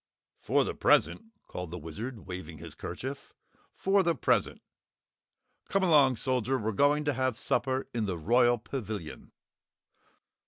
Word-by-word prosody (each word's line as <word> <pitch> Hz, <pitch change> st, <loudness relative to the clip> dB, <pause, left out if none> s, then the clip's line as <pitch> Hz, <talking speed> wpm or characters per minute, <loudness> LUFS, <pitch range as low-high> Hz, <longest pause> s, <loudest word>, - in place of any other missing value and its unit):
"For -, -, +2 dB
the -, -, -3 dB
present," -, -, +2 dB, 0.2 s
called 90 Hz, -1 st, -6 dB
the 90 Hz, -, -6 dB
Wizard, 105 Hz, -, -7 dB
waving 90 Hz, -3 st, -7 dB
his -, -, -10 dB
kerchief, 135 Hz, +2 st, -7 dB, 0.4 s
"for 195 Hz, +1 st, +2 dB
the 170 Hz, -3 st, +1 dB
present. -, -, 0 dB, 1.1 s
Come 195 Hz, -1 st, +1 dB
along, 145 Hz, -7 st, +5 dB
Soldier, 130 Hz, +2 st, 0 dB
we're 110 Hz, -2 st, -2 dB
going 145 Hz, +7 st, +2 dB
to 145 Hz, -, +1 dB
have 130 Hz, -3 st, -1 dB
supper 130 Hz, 0 st, 0 dB
in 115 Hz, -3 st, -1 dB
the 90 Hz, -3 st, -2 dB
Royal 120 Hz, +8 st, +3 dB
Pavilion!" 110 Hz, -, -6 dB
125 Hz, 135 wpm, -29 LUFS, 100-140 Hz, 1.1 s, along